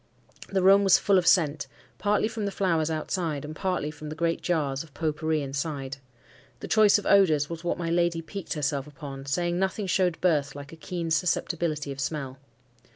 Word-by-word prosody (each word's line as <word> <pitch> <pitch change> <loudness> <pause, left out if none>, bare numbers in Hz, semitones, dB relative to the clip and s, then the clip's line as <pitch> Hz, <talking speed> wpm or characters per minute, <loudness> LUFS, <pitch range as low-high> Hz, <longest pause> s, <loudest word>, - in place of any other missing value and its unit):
The 190 -2 0
room 195 +1 +6
was 195 -2 +6
full 195 -2 +3
of 175 - -3
scent, 150 -5 +3 0.3
partly 210 +1 +2
from 220 -2 -4
the 200 - -2
flowers 165 -5 0
outside, 155 -2 -2
and 155 +1 -7
partly 180 -4 -2
from 150 0 -9
the 155 - -6
great 165 +1 -1
jars 145 -6 -1
of 155 -4 -13
pot 155 -2 -1
pourri 155 -1 0
inside. 140 0 -4 0.6
The - - -7
choice 215 -2 +5
of 205 - -6
odours 160 -7 +4
was 165 0 -6
what 175 - -1
my 170 -1 -2
lady 170 -1 +1
piqued 195 +3 -5
herself 145 -2 -2
upon, 140 -2 -9
saying 175 +4 0
nothing 190 +2 -1
showed 180 -2 +1
birth 145 -6 +1
like 145 +2 -9
a - - -8
keen 170 0 -5
susceptibility 160 -2 0
of 135 - -7
smell. 135 -2 -4
165 Hz, 195 wpm, -27 LUFS, 150-180 Hz, 0.6 s, room